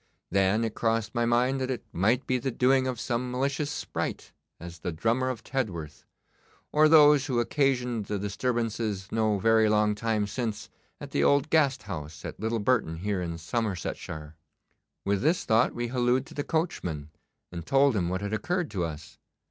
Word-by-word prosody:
Then 100 +3 +2
it 110 -2 -2
crossed 115 -1 0
my 120 0 +1
mind 125 +3 +2
that 130 - -2
it 125 -4 -3
might 110 +9 +2
be 130 0 0
the 135 - -2
doing 130 +2 +2
of 125 -3 -3
some 125 +1 -2
malicious 140 +4 -1
sprite, 145 - -4 0.3
as 85 0 -9
the 85 - -3
Drummer 115 +10 0
of 125 -4 -5
Tedworth, 90 - -4 0.7
or 155 +1 +5
those 150 -3 +6
who 125 -4 0
occasioned 125 -3 0
the 105 - -2
disturbances 110 -1 -2
no 110 -2 +1
very 110 +2 +4
long 105 0 +3
time 110 0 0
since 110 -1 -4 0.3
at - - -9
the - - +1
old 140 +2 +3
Gast 150 -5 +3
House 80 -6 -7
at - - -7
Little 110 +2 -1
Burton 110 -7 +1
here 100 +1 -2
in 85 -2 -4
Somersetshire. 95 -1 -3
(Note 80 - -7
F. 75 +2 -15
Appendix.) 80 - -50
With 100 -1 +1
this 160 +6 +1
thought 115 +2 +3
we 120 0 -2
hallooed 125 +1 +1
to - - -13
the 145 - -3
coachman, 90 - -2 0.4
and 85 -1 -6
told 135 - +3
him 90 -4 0
what 95 +1 -2
had 100 +1 -3
occurred 175 +8 -1
to 95 -4 -1
us. 80 -1 -7
115 Hz, 190 wpm, -28 LUFS, 100-130 Hz, 0.7 s, those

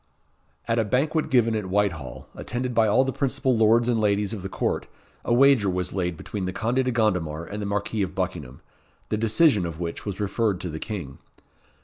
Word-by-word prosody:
At 115 0 +1
a - - +3
banquet 150 +8 0
given 115 -5 +3
at 105 -3 -2
Whitehall, 90 -9 -1
attended 125 0 -3
by 115 -1 +4
all 115 +6 +4
the 135 - -1
principal 135 -1 0
lords 115 +2 +4
and 115 -3 +1
ladies 105 0 +1
of 105 - -5
the 95 - -5
court, - - -2 0.4
a - - -2
wager 125 -4 +5
was 90 -1 -2
laid 90 -3 -2
between 100 +2 -5
the 95 - -2
Conde 120 +6 0
de 130 - 0
Gondomar 90 -9 0
and 105 +4 -6
the 100 - -3
Marquis 105 +1 -1
of 95 - -2
Buckingham, 65 +1 -4 0.5
the 105 - 0
decision 110 - +3
of 85 -2 -5
which 85 -1 -4
was 100 -1 -5
referred 105 -1 0
to 90 - -3
the 80 0 -5
King. 90 - -6
105 Hz, 205 wpm, -25 LUFS, 90-120 Hz, 0.5 s, wager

